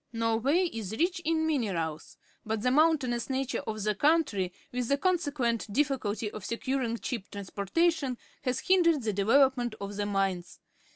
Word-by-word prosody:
Norway 230 +9 +1
is 220 -3 -5
rich 345 +2 +1
in 320 0 +1
minerals, 185 - -2 0.3
but 220 -1 -3
the 250 - +3
moun 315 +4 +5
tainous 240 -3 -3
nature 265 0 -1
of 215 -2 -3
the 210 0 +1
country, 275 - +2 0.2
with 245 -1 -2
the 280 - +2
consequent 285 - 0
difficulty 235 -5 0
of 215 - -8
securing 235 +1 -2
cheap 230 -4 -5
trans 200 -2 -8
portation, 280 - +1 0.2
has 255 -3 -1
hindered 335 -7 +3
the 215 -2 0
development 240 +3 +3
of 200 0 -6
the 205 0 -1
mines. 195 -3 -1
240 Hz, 160 wpm, -29 LUFS, 210-290 Hz, 0.3 s, moun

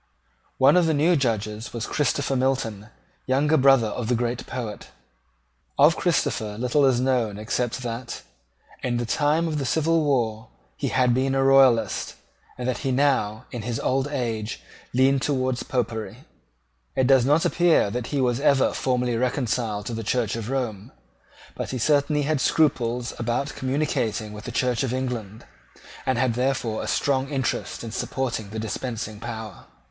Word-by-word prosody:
One 135 +7 +5
of 175 -2 +4
the 160 - +2
new 165 +5 +3
Judges 110 -5 -2
was 115 -2 -3
Christopher 140 -1 0
Milton, 125 -6 -1 0.4
younger 145 +4 +3
brother 135 -4 +5
of 115 +1 -4
the 125 - +2
great 120 +1 -2
poet. 115 -5 -6 0.9
Of 150 +3 +6
Christopher 110 - 0
little 125 +4 +2
is 125 -2 +3
known 125 -5 0
except 120 +3 -2
that, 120 +1 -5 0.6
in 120 -2 -1
the 120 - -1
time 150 +7 +1
of 155 -2 -2
the - - -2
civil 160 +4 +2
war, 115 -6 0 0.3
he - - -3
had 125 -2 +2
been 135 +2 +1
a 135 - +2
Royalist, 130 -6 +4 0.4
and 125 0 -4
that 130 - -1
he 135 - -1
now, 125 -6 +1
in 120 - -5
his 115 +1 -3
old 135 +1 0
age, 115 -6 -3 0.3
leaned 135 +2 +3
towards 130 -3 0
Popery. 115 -3 -3 0.7
It 130 - +2
does 135 -1 +5
not 150 +5 +3
appear 170 -12 +3
that 120 +1 -3
he 145 - -2
was 125 -1 +1
ever 140 -2 +3
formally 125 -2 0
reconciled 115 -4 -1
to 120 - -4
the 115 0 -4
Church 115 -1 0
of 115 0 -5
Rome: 120 -7 -3 0.6
but - - -5
he 130 - -3
certainly 145 +3 +2
had 150 -1 0
scruples 125 -7 +1
about 120 +5 -1
communicating 130 -6 -1
with 105 +1 -9
the 120 - -5
Church 125 0 0
of 130 -2 -1
England, 120 -5 -4 0.6
and 130 -2 +2
had 125 -1 +2
therefore 125 -2 -1
a - - -5
strong 135 -1 0
interest 135 -5 -2
in 115 - -6
supporting 120 -3 -3
the 110 - -6
dispensing 110 -1 -4
power. 110 -3 -7
125 Hz, 165 wpm, -24 LUFS, 115-135 Hz, 0.9 s, Of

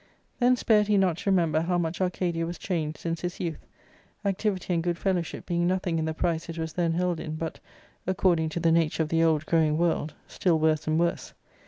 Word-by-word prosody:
Then 250 0 +5
spared 215 -3 +3
he 210 -1 +3
not 185 -4 +2
to 200 - -2
remember 165 -5 +2
how 175 +2 0
much 170 +1 -2
Arcadia 175 -2 0
was 175 - -5
changed 160 -5 -2
since 165 -1 -3
his 175 0 -4
youth, 165 -3 -4 0.6
activity 195 -2 -1
and 165 - +1
good 175 0 0
""^ - - -18
fellowship 180 -4 -2
being 175 0 0
nothing 180 -2 0
in 160 - -1
the 160 - -2
price 165 0 -1
it 165 - -5
was^thenlield 170 +1 -1
in, 155 0 -5
but, 160 0 -5 0.2
*/ - - -32
according 180 -4 +2
to 165 - -3
the 165 -1 +3
nature 165 -1 +2
of~the 165 +1 +1
old 155 -2 +2
growing 155 -2 +2
world, 165 -2 0
still 175 -4 +1
worse 155 0 +1
and 155 +1 +2
worse. 170 0 -1
170 Hz, 210 wpm, -27 LUFS, 160-180 Hz, 0.6 s, Then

